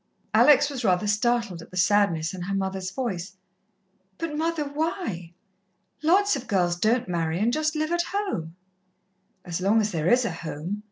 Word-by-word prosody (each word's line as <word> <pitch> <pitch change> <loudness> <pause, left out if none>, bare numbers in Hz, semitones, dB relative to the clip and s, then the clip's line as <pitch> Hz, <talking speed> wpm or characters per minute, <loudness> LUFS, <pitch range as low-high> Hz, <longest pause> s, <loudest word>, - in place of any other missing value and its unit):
Alex 290 -1 +6
was 275 -4 -5
rather 185 -1 +2
startled 210 -3 0
at - - -13
the 185 - -9
sadness 175 -3 +2
in 185 - -7
her 195 +3 -2
mother's 190 -1 -2
voice. 190 -6 -4 0.8
"But, 325 -2 -4
mother, 325 0 -1
why? 285 - -3 0.7
Lots 380 +4 +3
of 265 - -6
girls 175 -3 +1
don't 225 +6 +1
marry, 165 -2 -1
and 225 +5 +1
just 310 +1 0
live 310 +1 -1
at 345 0 +1
home." 360 - -3 0.9
"As 175 0 -4
long 205 +4 +3
as 210 -1 0
there 160 -2 -1
is 250 0 +4
a 220 - -1
home. 165 +4 -5
205 Hz, 170 wpm, -25 LUFS, 175-290 Hz, 0.9 s, Alex